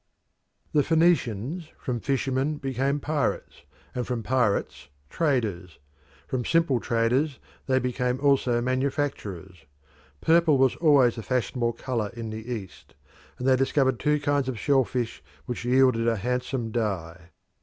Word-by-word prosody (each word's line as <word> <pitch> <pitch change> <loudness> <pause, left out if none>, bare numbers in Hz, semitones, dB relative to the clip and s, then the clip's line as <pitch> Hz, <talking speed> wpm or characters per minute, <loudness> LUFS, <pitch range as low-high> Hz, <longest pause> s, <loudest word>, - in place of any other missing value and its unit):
The 150 - +5
Phoenicians 160 - +1
from 125 -4 -3
fishermen 135 +3 -1
became 135 +1 -1
pirates, 150 0 -2 0.3
and 125 -1 -3
from 120 -3 -2
pirates 125 - 0 0.2
traders: 110 - -1 0.5
from 130 -2 -2
simple 165 -4 +2
traders 125 +6 +1 0.3
they 130 -1 +3
became 125 0 -1
also 135 -4 +2
manufacturers. 125 - -3 0.5
Purple 160 - +4
was 130 -1 +3
always 140 -8 +4
the - - -4
fashionable 120 0 -1
colour 115 -3 -3
in 115 -2 -5
the 110 +3 -7
East, 105 -6 -8 0.4
and 125 - -3
they 130 - +6
discovered 130 -1 +1
two 150 0 +2
kinds 145 -2 0
of 125 - -4
shell 135 +2 +2
fish 120 -2 -3 0.2
which 125 -2 -5
yielded 125 -2 +3
a 115 - +3
handsome 125 +2 -2
dye. 90 -7 -3
125 Hz, 135 wpm, -26 LUFS, 115-140 Hz, 0.5 s, they